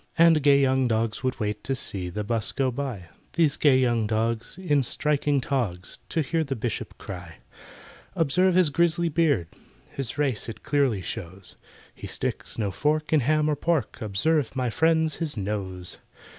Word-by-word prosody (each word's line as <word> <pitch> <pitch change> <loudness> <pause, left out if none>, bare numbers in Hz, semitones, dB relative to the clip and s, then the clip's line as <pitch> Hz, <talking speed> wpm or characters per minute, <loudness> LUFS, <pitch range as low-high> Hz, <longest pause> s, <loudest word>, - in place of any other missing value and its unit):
And 165 -2 +6
gay 140 0 +5
young 130 -1 +3
dogs 110 -1 0
would 130 -2 -1
wait 105 -1 -2
To 135 - 0
see 95 -7 -4
the 105 +4 -4
'bus 110 0 -1
go 130 -1 +1
by 120 -10 -5 0.2
(These 160 -4 +3
gay 140 -4 +5
young 120 -4 +2
dogs, 115 +5 -1
in 150 -7 +2
striking 145 +2 0
togs), 115 -10 -3
To 165 - 0
hear 160 +3 0
the 135 -3 -3
Bishop 115 -1 -4
cry: 90 -3 -8 0.8
"Observe 180 +4 +3
his 180 -5 +4
grisly 170 +2 +2
beard, 145 - +2 0.4
His 135 0 -3
race 135 -6 0
it 115 - -9
clearly 135 -10 +1
shows, 95 -1 -6 0.4
He - - -9
sticks - - -3
no 105 -4 -1
fork 150 - 0
in 155 - +6
ham 150 +3 +2
or 150 - +2
pork— 155 -5 -1
Observe, 130 +8 0
my 125 -2 0
friends, 160 +2 +2
his 155 -6 0
nose. 95 -3 -4
130 Hz, 170 wpm, -26 LUFS, 110-155 Hz, 0.8 s, And